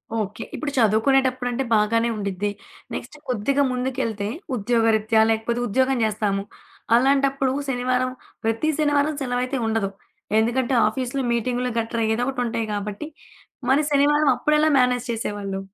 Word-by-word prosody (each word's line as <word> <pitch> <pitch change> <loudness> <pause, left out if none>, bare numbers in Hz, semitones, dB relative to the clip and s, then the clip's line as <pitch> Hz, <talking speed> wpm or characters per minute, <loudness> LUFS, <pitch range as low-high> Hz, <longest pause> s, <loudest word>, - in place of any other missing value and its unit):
Okay. 215 +1 -3
ఇప్పుడు 295 -2 -3
చదువుకునేటప్పుడంటే 255 +3 +2
బాగానే 230 +2 +2
ఉండిద్ది. 200 0 -2 0.4
నెక్స్ట్ - - -6
కొద్దిగా 260 +5 +1
ముందుకెళ్తే 250 -5 -2 0.3
ఉద్యోగరీత్యా 220 -1 +2
లేకపోతే 235 +2 -1
ఉద్యోగం 260 +4 +1
చేస్తాము. 205 -2 -1 0.5
అలాంటప్పుడు 270 +1 +2 0.2
శనివారం 255 0 0 0.3
ప్రతి 225 +7 0
శనివారం 290 0 +2
సెలవయితే 250 +1 -1
ఉండదు. 220 -3 0 0.5
ఎందుకంటే 240 +3 +1
ఆఫీస్‌లో 255 +4 -2
మీటింగ్లు 245 +2 -1
గట్రా 230 0 -2
ఏదోకటి 245 +3 -1
ఉంటాయి 230 -1 -2
కాబట్టి. 205 +7 -4 0.6
మరి 290 +3 +4
శనివారం 295 +1 +4
అప్పుడెలా 300 +4 +3
మేనేజ్ 250 -1 +2
చేసేవాళ్ళు? 205 -4 -3
245 Hz, 115 wpm, -23 LUFS, 220-265 Hz, 0.6 s, మరి